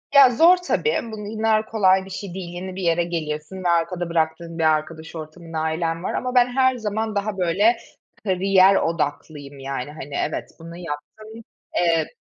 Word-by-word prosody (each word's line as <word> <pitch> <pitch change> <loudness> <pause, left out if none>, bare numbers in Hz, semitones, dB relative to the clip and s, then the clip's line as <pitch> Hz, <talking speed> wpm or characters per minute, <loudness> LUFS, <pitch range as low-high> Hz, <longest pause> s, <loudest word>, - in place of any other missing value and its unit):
Ya, 275 -2 +9
zor 330 +9 +6
tabii, 450 +6 0
bu 210 -1 -6
illa 220 0 +1
kolay 190 -4 +3
bir - - -11
şey 195 -1 -6
değil, 185 -2 -6
yeni 185 +1 -6
bir 190 - -5
yere 170 -1 +2
geliyorsun 165 +1 -4
ve 175 - +1
arkada 170 +1 0
bıraktığın 165 0 -1
bir - - +1
arkadaş 160 +1 0
ortamın, 165 +1 -9
ailen 165 +1 -1
var - - -2
ama 255 0 -2
ben 245 -1 +6
her 260 +1 +2
zaman 220 -1 -2
daha 200 0 -2
böyle 195 +6 +3 0.5
kariyer 190 0 +4
odaklıyım, 145 -4 -2
yani, 135 0 -4
hani, 145 -2 -8
evet - - -5
bunu 165 +1 -10
yaptım, 175 +6 -8 0.5
eee 165 -3 +2
175 Hz, 170 wpm, -22 LUFS, 160-210 Hz, 0.5 s, Ya